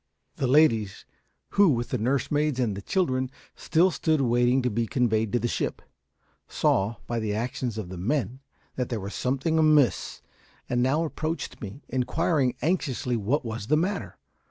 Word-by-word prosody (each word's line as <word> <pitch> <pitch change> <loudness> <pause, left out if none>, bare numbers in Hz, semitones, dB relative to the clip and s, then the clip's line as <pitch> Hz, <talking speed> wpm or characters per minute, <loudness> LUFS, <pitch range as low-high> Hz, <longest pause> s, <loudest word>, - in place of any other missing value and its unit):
The 130 - 0
ladies 115 - +3 0.4
who, 200 -2 +5
with 120 -4 0
the 125 - -1
nursemaids 140 +4 0
and 105 -5 -1
children, 130 -9 0 0.3
still 175 +4 +2
stood 160 -2 +1
waiting 120 0 +2
to 125 - 0
be 115 +2 -1
conveyed 110 -3 +1
to 120 - +2
the 120 - -1
ship - - -2 0.7
saw, 100 +4 +1
by 120 -1 -2
the 105 -2 -2
actions 120 0 -3
of 105 -5 -5
the 90 -1 -7
men, 125 +3 -1 0.4
that 125 -2 -1
there 115 - -2
was 100 +1 -6
something 140 +5 0
amiss, 150 -8 +3 0.4
and 120 0 0
now 140 +6 +2
approached 160 0 -4
me, 110 +7 -8
inquiring 130 +1 0
anxiously 145 -6 0
what 120 +6 0
was 110 -2 -5
the 150 - +3
matter. 190 +5 -2
125 Hz, 160 wpm, -26 LUFS, 115-150 Hz, 0.7 s, who